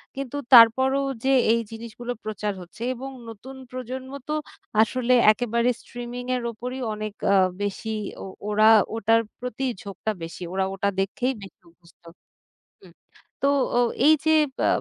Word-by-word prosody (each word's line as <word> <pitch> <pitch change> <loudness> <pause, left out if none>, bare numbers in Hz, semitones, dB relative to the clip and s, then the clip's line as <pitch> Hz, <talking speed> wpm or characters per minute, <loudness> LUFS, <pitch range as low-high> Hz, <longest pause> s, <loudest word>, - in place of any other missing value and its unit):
কিন্তু 275 +1 -5 0.2
তারপরও 260 +4 +7 0.2
যে 270 - +1 0.2
এই 230 - +3
জিনিসগুলো 235 +2 -7
প্রচার 210 -1 -3
হচ্ছে 180 +6 -14
এবং 265 +2 -7 0.2
নতুন 250 +5 -10
প্রজন্ম 255 +1 -6 0.2
তো 305 - -2 0.5
আসলে 250 +2 +1 0.2
একেবারে 235 +1 0
স্ট্রিমিং 245 +1 -7
এর 245 - -3
উপরেই 250 +3 -6
অনেক 215 -1 -5 0.2
আ - - +5 0.3
বেশি 205 +2 -3 0.3
ও - - -6 0.2
ওরা 215 +1 +4 0.3
ওটার 225 +1 +3 0.2
প্রতিই 250 +1 -3
ঝোঁকটা 200 +2 -4
বেশি। 165 +2 -8
ওরা 190 0 +1
ওটা 195 +1 -1
দেখেই 245 +7 -1
বেশি 195 - -12
অভ্যস্থ 170 0 -25 0.8
হুম। - - -17 0.5
তো - - +3 0.3
ও - - +4 0.3
এই 315 - +8
যে 315 - +3 0.3
বা - - +1
235 Hz, 145 wpm, -24 LUFS, 210-255 Hz, 0.8 s, এই